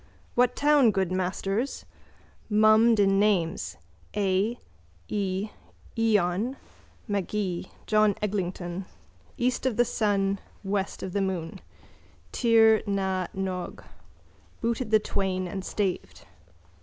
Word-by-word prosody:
What 250 0 +3
town, 290 -4 +5
good 190 -3 0
masters? 195 +6 -2 0.6
Mummed 215 +1 +5
in 195 -1 +4
names: 165 - +1 0.4
A. 200 +3 +1 0.5
E., 195 0 -1 0.5
eon: 220 +2 +1 0.5
Magee, 200 -3 -2 0.2
John 215 -2 +3
Eglinton. 185 -3 -3 0.5
East 250 +1 0
of 245 - -1
the 240 - +4
sun, 200 -3 0 0.2
west 195 0 -2
of 185 - -5
the 200 - +1
moon: 185 -2 -3 0.7
Tir 225 -2 +5
na 190 -2 0
n 190 0 -1
og. 180 -1 -5 0.8
Booted 235 0 -1
the 215 - +6
twain 190 -3 -2
and 190 +1 -5
staved. 195 -1 -3
200 Hz, 105 wpm, -27 LUFS, 185-220 Hz, 0.8 s, the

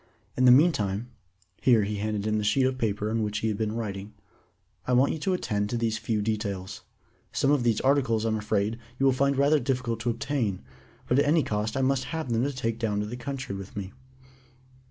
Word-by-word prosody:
In 130 - +2
the 125 - +8
meantime" 120 - +3 0.5
(here 115 -5 +5
he 105 +1 -2
handed 105 0 -2
him 110 0 +1
the - - -2
sheet 130 +6 +3
of 130 0 -1
paper 105 -2 -1
upon 115 +1 0
which 105 -1 -1
he 110 +1 0
had 105 - -2
been 110 -1 -1
writing) 105 -2 -5 0.7
"I 125 - +1
want 130 +3 +4
you 160 - -5
to 185 +5 0
attend 105 - -1
to 120 - -1
these 115 -2 -1
few 110 -2 -1
details. 100 -3 -3 0.5
Some 140 - +2
of 145 -3 +3
these 115 -3 +2
articles, 130 -5 +2
I'm 110 -1 +1
afraid, 105 +2 -1 0.2
you 135 - +1
will 135 - +5
find 140 +1 +1
rather 145 +2 +4
difficult 125 -3 -1
to 120 +1 -1
obtain, 115 -5 -2 0.4
but 125 - +3
at 145 - +3
any 155 +1 +3
cost 105 +1 -2
I - - +1
must 135 0 +1
have 160 -6 -4
them 115 - +1
to 145 - -1
take 115 -4 -3
down 105 -3 0
to - - -2
the 110 +3 -5
country 130 -2 -5
with 95 +1 -8
me." 100 -1 -5
115 Hz, 220 wpm, -27 LUFS, 105-130 Hz, 0.7 s, the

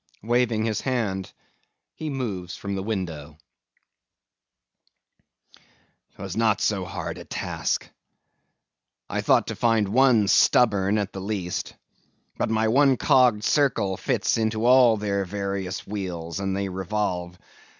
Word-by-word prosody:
(waving 115 -1 +1
his 110 -2 -1
hand, 105 -8 -2 0.6
he 155 - -5
moves 105 -10 -4
from 100 -1 -5
the 95 - -2
window.) 85 -8 -5 2.8
'Twas 95 -2 -7
not 110 -2 +2
so 100 -3 0
hard - - -6
a - - -8
task. - - -3 1.2
I - - -1
thought - - +3
to - - -5
find 115 -3 +2
one 120 -2 +4
stubborn, 100 -2 +3
at 100 -1 -2
the 95 - -6
least; 95 -3 -4 0.6
but - - -1
my 110 0 +1
one 135 +3 +4
cogged 125 -6 +3
circle 130 -10 +1
fits 115 - 0
into 110 0 0
all 125 -2 +6
their 100 -1 -1
various 100 -1 -4
wheels, 90 -4 -5
and 95 -1 -2
they 100 0 -2
revolve. 95 -2 -3
105 Hz, 125 wpm, -24 LUFS, 95-115 Hz, 2.8 s, all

